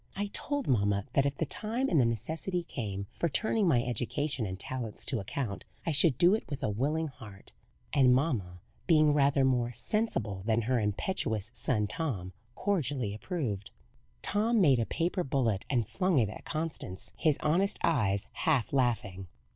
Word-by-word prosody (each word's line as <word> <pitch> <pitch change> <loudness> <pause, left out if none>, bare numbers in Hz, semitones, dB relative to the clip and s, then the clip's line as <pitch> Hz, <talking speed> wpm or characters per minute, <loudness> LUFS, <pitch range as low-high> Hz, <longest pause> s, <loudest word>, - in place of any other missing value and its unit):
I 205 0 -3
told 285 -2 -2
mamma 100 -4 +2
that 135 +1 +3
if 140 - -2
the 160 - -1
time 230 - -1
and 160 - +4
the 120 - +3
necessity 160 - -2
came 100 - -4
for 170 - -1
turning 220 +5 +1
my 125 -7 +3
education 125 0 -1
and 95 0 -6
talents 120 -2 -5
to 125 - 0
account, 100 +1 -4 0.2
I 165 - +1
should 145 -2 +4
do 175 +5 +5
it 220 - 0
with 145 -1 -5
a 110 - +1
willing 150 +9 0
heart; 110 -7 -12 0.4
and 135 -4 +5
mamma, 120 - 0 0.3
being 155 -3 +5
rather 140 -1 +3
more 120 -2 +1
sensible 120 - -1
than 115 0 +2
her 125 +2 +1
impetuous 110 - -1
son 110 -4 +1
Tom, 105 - -3 0.2
cordially 145 - -1
approved." 110 - -3 0.5
Tom 220 +3 +2
made 140 -10 +5
a 115 - 0
paper 175 +2 -1
bullet 120 - 0
and 120 -6 +1
flung 185 -4 +1
it 110 -5 +3
at - - -10
Constance, 155 - -4
his 155 -3 +2
honest 180 +6 +2
eyes 100 -11 +2
half 140 -7 +1
laughing. 110 -8 0
130 Hz, 170 wpm, -30 LUFS, 110-165 Hz, 0.5 s, do